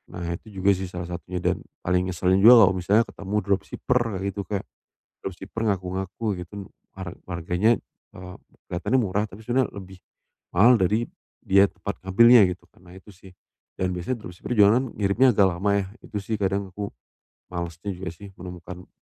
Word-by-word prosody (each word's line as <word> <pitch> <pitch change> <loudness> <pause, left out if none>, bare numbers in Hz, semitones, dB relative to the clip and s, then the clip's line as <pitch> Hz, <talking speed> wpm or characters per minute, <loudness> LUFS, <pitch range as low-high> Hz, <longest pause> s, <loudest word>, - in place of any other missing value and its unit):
Nah, 90 - -5 0.2
itu - - -23 0.2
juga 100 - +6
sih 95 0 -5
salah 90 -1 -6
satunya 90 +1 -5
dan - - +1 0.2
paling 90 +1 +1
ngeselin 90 +2 +2
juga 115 0 +10
kalau 95 - +2
misalnya 105 +6 +3
ketemu 100 +1 -6
dropshipper 100 +5 0 0.2
kayak 95 - -4
gitu, 100 +1 -5
Kak. 100 0 -2 0.6
Dropshipper 95 +4 -7
ngaku-ngaku 95 +2 -4 0.2
gitu, 90 +3 -12 0.4
har 90 -2 -6 0.2
harganya, 90 +6 +1 0.4
eee, 90 0 -9 0.4
kelihatannya 90 +9 0
murah, 105 0 0
tapi 100 +4 -12
sebenarnya 125 +1 +1
lebih 95 -1 -10 0.6
mahal 115 +8 +7
dari 105 +6 +1 0.4
dia 100 +1 +5
tempat 100 - -6
ngambilnya, 115 +3 +7
gitu - - -28
kan. - - -24
Nah 90 - -13
itu 95 +2 -14
sih, 95 -1 -16 0.4
dan 95 0 -1
biasanya 105 +7 -4
dropshipper 90 +6 -6
juga 105 +2 +6
kan - - -2
ngirimnya 110 +5 +3
agak 100 -1 +5
lama 95 +4 -1
yah, 95 - -8 0.2
itu 105 - -4
sih, 110 +3 -2
kadang 100 0 -1
aku 100 +2 -4 0.6
malesnya 85 +2 -4
juga 90 +1 -6
sih 100 +3 -12
menemukan 90 0 -9
95 Hz, 175 wpm, -25 LUFS, 90-105 Hz, 0.6 s, juga